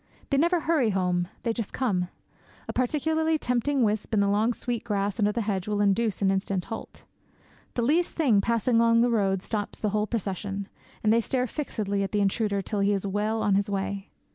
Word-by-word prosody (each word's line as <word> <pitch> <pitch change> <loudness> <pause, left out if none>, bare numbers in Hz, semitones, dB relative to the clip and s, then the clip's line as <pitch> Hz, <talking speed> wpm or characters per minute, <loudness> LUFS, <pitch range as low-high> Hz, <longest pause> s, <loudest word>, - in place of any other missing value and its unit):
They 275 - +3
never 340 +3 +3
hurry 305 -8 +2
home; 180 -3 0 0.2
they 230 - 0
just 225 -2 -4
come. 190 -9 0 0.6
A - - -4
particularly 315 +5 +1
tempting 250 0 +1
wisp 215 +1 0
in - - +3
the 200 - +3
long 210 +4 +2
sweet 240 -1 -3
grass 200 0 -1
under 210 -1 +3
the 230 +1 -1
hedge 195 -3 -2
will 210 -1 0
induce 205 +1 +1
an 195 - +4
instant 190 -1 -1
halt. 225 - -8 0.7
The 240 - 0
least 325 +8 +2
thing 245 -11 +3
passing 230 +2 +1
along 230 0 +5
the 240 0 +3
road 195 -4 +1
stops 210 -2 -3
the 215 - -1
whole 210 +1 0
procession; 200 -2 -3 0.4
and 215 0 +4
they 230 - +4
stare 250 +2 0
fixedly 210 -7 -2
at 195 - -3
the 210 - +2
intruder 200 0 0
till 210 +2 -3
he 200 +1 +3
is 195 0 -2
well 210 +3 -1
on 205 - +2
his 200 +1 +1
way. 200 0 -3
210 Hz, 205 wpm, -27 LUFS, 200-240 Hz, 0.7 s, along